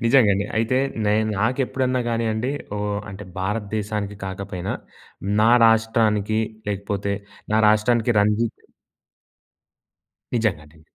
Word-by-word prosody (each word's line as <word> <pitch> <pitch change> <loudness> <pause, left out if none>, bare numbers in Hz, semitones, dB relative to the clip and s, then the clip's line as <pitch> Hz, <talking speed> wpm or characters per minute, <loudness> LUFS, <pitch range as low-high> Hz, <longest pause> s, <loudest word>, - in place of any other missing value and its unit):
నిజంగా 115 -2 +5
అండి. 100 +1 -1
అయితే 115 +3 +2 0.3
నేను 105 +1 +2
నాకు 115 +6 +1
ఎప్పుడన్నా 130 0 0
కానియండి 115 +1 0 0.3
ఓహ్! 105 0 -1
అంటే 95 +1 -8
భారతదేశానికి 105 +1 -2
కాకపోయినా 95 -1 -4 0.7
నా 110 +2 +5 0.2
రాష్ట్రానికి 110 -1 +2 0.3
లేకపోతే 100 0 -2 0.4
నా 110 - +4
రాష్ట్రానికి 115 +2 +3
రంజిత్ 105 +2 0 1.8
నిజంగాండి. 80 -9 -2
105 Hz, 100 wpm, -23 LUFS, 100-115 Hz, 1.8 s, నిజంగా